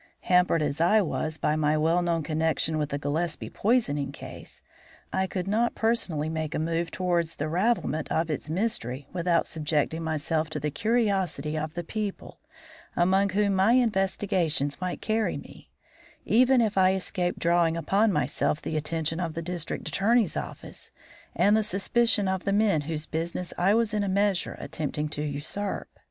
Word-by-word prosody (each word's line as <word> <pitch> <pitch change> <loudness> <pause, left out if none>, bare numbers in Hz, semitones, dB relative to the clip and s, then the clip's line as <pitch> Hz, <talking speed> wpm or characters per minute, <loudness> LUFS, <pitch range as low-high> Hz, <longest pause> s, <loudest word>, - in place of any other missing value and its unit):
Hampered 180 -3 +3
as 145 +2 -1
I 195 +6 +5
was 160 -2 -3
by 150 -1 +1
my 155 0 +2
well 165 +3 +2
known 170 -2 0
connection 160 0 0
with 150 -1 -1
the 140 - -2
Gillespie 155 +3 -2
poisoning 150 - +1
case, - - -10 0.5
I 190 0 +1
could 185 -1 -4
not 225 +4 +1
personally 190 -10 0
make 160 0 -3
a - - 0
move 165 +2 -1
towards 170 -3 -1
the 155 - -3
ravelment 175 -3 0
of 160 0 0
its 150 0 -4
mystery 150 - -2
without 175 -1 +1
subjecting 155 +1 -1
myself 160 0 -1
to - - -4
the 150 - -2
curiosity 195 -8 0
of 155 +1 -3
the 175 - -3
people 210 +3 -5 0.6
among 190 +3 +3
whom 200 +1 +1
my 195 +4 +4
investigations 190 - +1
might 180 -1 -3
carry 220 0 0
me, - - -13 0.6
even 255 +2 +5
if 210 -3 +1
I 185 0 +5
escaped 180 -1 -2
drawing 170 -1 +2
upon 200 +7 +2
myself 150 -1 0
the 155 - -3
attention 160 +1 -2
of 170 -2 -3
the 165 - -3
District 175 -1 -4
Attorney's 225 +1 +2
office - - -7 0.5
and 205 +1 +4
the 220 - +3
suspicion 210 +1 +1
of 190 -1 -1
the 200 - 0
men 205 -6 +3
whose 155 -1 -3
business 170 +3 -4
I 195 +4 +3
was 230 -2 +1
in 210 -1 +1
a 200 - -1
measure 200 -1 +1
attempting 150 0 -3
to 150 - -4
usurp. 150 +7 -3
175 Hz, 170 wpm, -27 LUFS, 155-200 Hz, 0.6 s, I